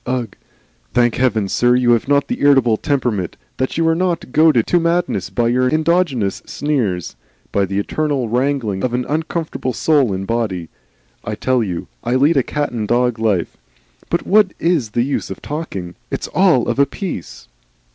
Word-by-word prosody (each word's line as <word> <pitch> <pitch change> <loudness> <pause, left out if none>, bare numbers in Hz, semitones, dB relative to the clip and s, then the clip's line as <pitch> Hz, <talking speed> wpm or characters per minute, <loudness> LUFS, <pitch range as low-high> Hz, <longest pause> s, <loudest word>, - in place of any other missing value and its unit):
Ugh! 125 -2 -2 0.6
Thank 120 -2 +3
Heaven, 115 -5 +1
sir, 120 +5 +3
you 125 -1 +3
have 115 +1 +2
not 140 0 +2
the 245 - -3
irritable 135 -5 +4
temperament, 120 - -1 0.2
that 130 +3 -2
you 165 0 +2
are 165 - +4
not 175 -5 -1
goaded 155 -6 +4
to 175 - +2
madness 170 +1 0
by 120 -1 0
your 125 +1 +2
endogenous 155 - +1
sneers, 120 - -2 0.4
by 100 -1 +2
the 95 +1 -4
eternal 140 +4 -1
wrangling 120 -5 -1
of 125 -1 0
an 125 0 -1
uncomfortable 160 -3 -2
soul 140 -2 +2
and 95 0 -3
body. 100 -7 -2 0.5
I - - -4
tell 130 -1 +1
you, 90 -5 -4 0.2
I 125 - 0
lead 145 +5 +4
a 135 - +4
cat 145 +3 -2
and 110 -3 -3
dog 120 0 +1
life 105 -6 0 0.5
But 170 - -1
what 205 -2 +3
IS 165 -10 +1
the 120 +2 0
use 140 +2 -2
of - - -6
talking? 100 - -5 0.2
It's - - -3
all 180 -10 +3
of - - -1
a 140 - +5
piece!" 115 - -6
125 Hz, 175 wpm, -18 LUFS, 115-155 Hz, 0.6 s, a